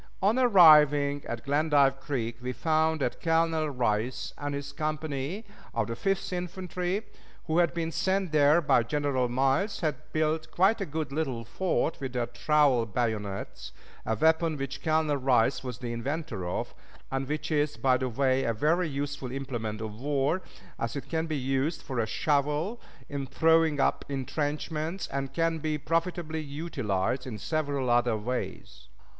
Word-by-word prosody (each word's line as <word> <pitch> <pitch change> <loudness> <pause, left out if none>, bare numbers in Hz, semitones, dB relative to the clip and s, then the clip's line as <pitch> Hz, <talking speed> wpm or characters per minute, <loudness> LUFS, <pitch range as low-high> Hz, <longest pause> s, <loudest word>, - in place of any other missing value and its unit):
On 210 +6 +2
arriving 150 - +6
at 115 +1 -5
Glendive 145 -1 +3
Creek 120 -5 -3
we 125 0 -3
found 160 +4 +1
that 125 - -2
Colonel 165 -1 +2
Rice 120 -2 -1
and 145 0 -4
his 140 0 -5
company 155 +5 -3 0.3
of - - +1
the 115 +2 -4
Fifth 195 +7 -1
Infantry, 180 +2 -3 0.4
who 160 +1 +1
had 175 -1 +2
been 165 -1 -2
sent 190 +1 0
there 150 +2 +5
by 140 -5 +4
General 130 0 0
Miles, 135 - +1
had 155 -3 -3
built 155 0 0
quite 200 +5 +3
a 195 - -2
good 155 -1 -3
little 135 -6 -2
fort 170 - -1
with 135 -2 -5
their 120 -1 0
trowel 140 -5 +2
bayonets, 105 -3 -3 0.3
a 110 - 0
weapon 160 +4 +2
which 135 -1 -5
Colonel 155 -2 +1
Rice 130 0 +2
was 125 -3 -5
the 120 -1 -5
inventor 120 - -3
of, - - -3 0.4
and 135 0 -2
which 150 +2 -3
is, 150 -1 +1
by 130 -1 +3
the 130 0 -2
way, 130 +2 +1
a 115 - 0
very 160 +8 +2
useful 140 -2 -4
implement 120 -5 -4
of 110 +1 -6
war, 145 +5 +1 0.4
as 115 +3 -2
it 140 - -6
can 160 0 -1
be 155 -2 -2
used 135 +4 -1
for 130 -3 -3
a 110 - +1
shovel 150 - 0 0.3
in 140 -2 -4
throwing 160 0 +3
up - - +2
intrenchments, 150 +5 -2
and 135 0 -3
can 165 +2 0
be 155 0 -1
profitably 165 +1 -1
utilized 135 - -2
in 115 -4 -5
several 140 0 -1
other 120 -2 +3
ways. 105 - -5
145 Hz, 160 wpm, -28 LUFS, 130-160 Hz, 0.4 s, arriving